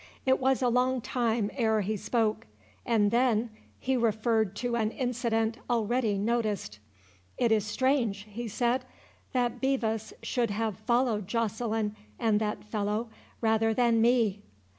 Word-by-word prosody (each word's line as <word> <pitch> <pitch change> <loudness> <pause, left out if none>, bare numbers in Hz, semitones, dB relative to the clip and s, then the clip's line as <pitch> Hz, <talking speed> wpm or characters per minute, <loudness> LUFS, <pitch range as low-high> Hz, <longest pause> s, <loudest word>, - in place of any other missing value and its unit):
It 260 0 +3
was 265 0 +2
a - - +4
long 250 +2 +2
time 230 -3 0
ere 220 -4 +2
he 210 +2 -1
spoke, 220 - -1 0.4
and 215 -4 +3
then 235 -2 +2 0.3
he 265 +1 -1
referred 220 -3 +1
to 240 +2 -2
an 220 -2 +1
incident 235 -2 -1
already 230 -2 +1
noticed. 210 - -1 0.6
"It 235 -2 +2
is 215 -2 +2
strange," 235 -3 +1
he 230 +3 -6
said, 240 +4 0 0.5
"that 245 -1 0
Bevis 225 -5 0
should 240 -3 0
have 215 -1 -2
followed 235 -3 +1
Joceline 220 -1 -1 0.2
and 215 -2 +2
that 210 -1 -2
fellow 210 +2 -2 0.3
rather 225 0 +2
than 235 -2 +3
me." 225 -4 +3
225 Hz, 140 wpm, -29 LUFS, 215-245 Hz, 0.6 s, a